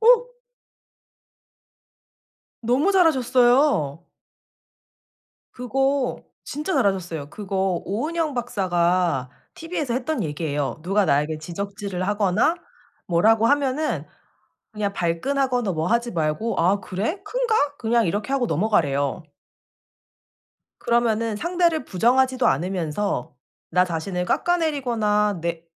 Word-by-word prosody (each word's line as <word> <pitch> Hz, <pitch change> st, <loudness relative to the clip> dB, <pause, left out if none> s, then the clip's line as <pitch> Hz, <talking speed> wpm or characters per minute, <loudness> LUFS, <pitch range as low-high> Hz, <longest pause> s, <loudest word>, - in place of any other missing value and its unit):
어? -, -, +4 dB, 2.3 s
너무 260 Hz, -, +2 dB
잘하셨어요. 255 Hz, -, +3 dB, 1.5 s
그거 270 Hz, +2 st, 0 dB, 0.2 s
진짜 305 Hz, +6 st, -4 dB
잘하셨어요. 175 Hz, -7 st, -1 dB
그거 190 Hz, -3 st, -2 dB
오은영 305 Hz, -, -2 dB
박사가 180 Hz, -, 0 dB, 0.2 s
티브이에서 315 Hz, -7 st, -3 dB
했던 270 Hz, +5 st, -1 dB
얘기예요. 150 Hz, -1 st, -3 dB
누가 195 Hz, +4 st, +2 dB
나에게 150 Hz, 0 st, +1 dB
지적질을 190 Hz, +2 st, -5 dB
하거나 205 Hz, -, +2 dB, 0.5 s
뭐라고 220 Hz, +6 st, +3 dB
하면은 285 Hz, +2 st, +1 dB, 0.7 s
그냥 210 Hz, -2 st, -2 dB
발끈하거나 245 Hz, +7 st, 0 dB
뭐 160 Hz, -1 st, -2 dB
하지 235 Hz, +2 st, +1 dB
말고 165 Hz, +7 st, -1 dB
"아 190 Hz, +4 st, +3 dB
그래? 215 Hz, -, -3 dB
큰가?" 465 Hz, +1 st, 0 dB, 0.2 s
그냥 230 Hz, -1 st, +2 dB
이렇게 205 Hz, +9 st, -2 dB
하고 275 Hz, -3 st, +1 dB
넘어가래요. 150 Hz, -, 0 dB, 1.6 s
그러면은 230 Hz, -2 st, +1 dB
상대를 340 Hz, 0 st, +1 dB
부정하지도 255 Hz, +6 st, +2 dB
않으면서 170 Hz, +1 st, -1 dB, 0.4 s
나 180 Hz, +2 st, +4 dB
자신을 180 Hz, +1 st, -3 dB
깎아내리거나 235 Hz, -, +1 dB
내 170 Hz, 0 st, -3 dB
210 Hz, 255 characters per minute, -23 LUFS, 175-265 Hz, 2.3 s, 어